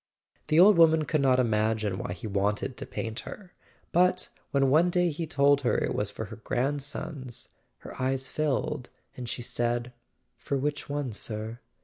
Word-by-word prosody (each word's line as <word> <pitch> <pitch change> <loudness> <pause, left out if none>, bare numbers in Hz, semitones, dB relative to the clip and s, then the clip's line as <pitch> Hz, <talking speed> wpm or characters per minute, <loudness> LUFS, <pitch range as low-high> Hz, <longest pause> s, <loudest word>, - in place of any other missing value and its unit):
The 155 - +4
old 190 0 +7
woman 160 -1 +6
could 155 0 +1
not 130 -2 +4
imagine 110 -4 +1
why 90 - -3
he 90 - -9
wanted 105 +5 -1
to - - -7
paint 110 -1 -4
her; 190 -4 -10 0.4
but 180 +1 +3 0.2
'when 135 -1 +2
one 165 +5 +5
day 175 -1 +2
he 160 +2 -4
told 140 -1 +3
her 125 - +2
it - - 0
was 105 - -1
for 110 - -6
her 110 +1 -9
grandsons, 135 +1 -3 0.3
her - - -9
eyes 130 +1 0
filled, 150 -2 -1 0.3
and 125 -2 -6
she 120 +1 -4
said: 120 +1 -1 0.5
"For 140 - -2
which 145 +2 -2
one, 140 -4 -2
sir? 110 +2 -5
130 Hz, 170 wpm, -28 LUFS, 115-150 Hz, 0.5 s, old